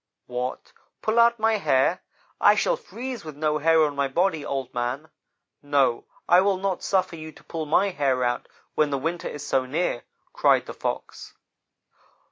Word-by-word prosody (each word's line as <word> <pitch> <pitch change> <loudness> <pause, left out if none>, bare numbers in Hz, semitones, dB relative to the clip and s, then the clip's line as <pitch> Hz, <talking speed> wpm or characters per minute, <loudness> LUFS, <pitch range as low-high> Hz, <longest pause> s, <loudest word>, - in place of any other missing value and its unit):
"'What! 125 +1 -5 0.3
Pull 220 +2 +2
out 235 0 +5
my 220 0 +2
hair? 150 -2 +2 0.4
I - - +6
shall - - +2
freeze 260 - -7
with 155 -2 -8
no 150 0 0
hair 160 +1 +4
on 145 -2 0
my 140 0 +1
body, 160 +2 0
Old 135 -3 -4
man. 125 +6 -3 0.5
No 140 -4 +1 0.2
I 175 +1 +6
will 195 -1 +2
not 190 -1 -2
suffer 185 -3 0
you 155 -1 -8
to - - -18
pull 160 -2 -5
my 195 +6 +3
hair 135 -5 0
out 120 0 -1 0.3
when 155 -1 +2
the 140 - -1
winter 165 +5 -3
is 145 0 -6
so 130 -3 0
near,' 150 -2 -1 0.3
cried - - +3
the - - -7
Fox. - - -5
155 Hz, 175 wpm, -25 LUFS, 135-190 Hz, 0.5 s, I